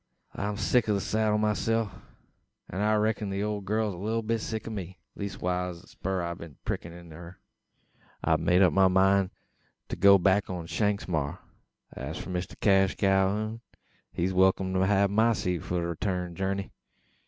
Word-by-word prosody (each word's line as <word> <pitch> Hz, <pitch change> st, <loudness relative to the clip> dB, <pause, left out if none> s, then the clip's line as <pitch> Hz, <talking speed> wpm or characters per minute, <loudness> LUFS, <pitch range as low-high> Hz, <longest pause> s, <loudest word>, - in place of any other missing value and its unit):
I'm 105 Hz, 0 st, -3 dB
sick 110 Hz, +2 st, +2 dB
o' 105 Hz, -, +3 dB
the -, -, 0 dB
seddle 110 Hz, +1 st, +1 dB
myself, 110 Hz, 0 st, 0 dB, 0.8 s
an 95 Hz, -, -3 dB
I 105 Hz, +1 st, +3 dB
reck'n 105 Hz, -1 st, 0 dB
the 100 Hz, +1 st, -2 dB
ole 105 Hz, -1 st, -2 dB
gal's 105 Hz, +1 st, -1 dB
a -, -, -9 dB
leetle 110 Hz, +4 st, -1 dB
bit 115 Hz, 0 st, -1 dB
sick 110 Hz, +1 st, -4 dB
o' -, -, -4 dB
me 95 Hz, -3 st, -6 dB, 0.2 s
leestwise 90 Hz, -3 st, -3 dB
o' -, -, -14 dB
the -, -, -19 dB
spur 95 Hz, -1 st, -3 dB
I've 85 Hz, 0 st, -4 dB
been 85 Hz, -3 st, -9 dB
a -, -, -31 dB
prickin' 85 Hz, -, -3 dB
into 85 Hz, -2 st, -12 dB
her. 85 Hz, +2 st, -11 dB, 0.8 s
I've 80 Hz, -1 st, +3 dB
made 90 Hz, +4 st, +4 dB
up 90 Hz, -, +4 dB
my 95 Hz, -1 st, +5 dB
mind 95 Hz, +1 st, +3 dB, 0.6 s
to -, -, -2 dB
go 100 Hz, +2 st, +7 dB
back 95 Hz, +2 st, +2 dB
on 90 Hz, -3 st, -4 dB
Shanks's 105 Hz, +3 st, -1 dB
maar, 75 Hz, -5 st, -1 dB, 0.5 s
an -, -, -9 dB
as 80 Hz, -, -5 dB
for -, -, -6 dB
Mister 90 Hz, 0 st, -4 dB
Cash 95 Hz, -2 st, +3 dB
Calhoun, 100 Hz, +3 st, +1 dB, 0.5 s
he's 90 Hz, +2 st, -1 dB
welkim 95 Hz, 0 st, +3 dB
to 95 Hz, 0 st, +2 dB
hev 100 Hz, -1 st, +3 dB
my 110 Hz, +3 st, +4 dB
seat 90 Hz, -4 st, -1 dB
for 90 Hz, -, -4 dB
the 85 Hz, -1 st, 0 dB
reeturn 90 Hz, +1 st, -2 dB
jerney. 95 Hz, +2 st, -2 dB
95 Hz, 190 wpm, -28 LUFS, 90-105 Hz, 0.8 s, go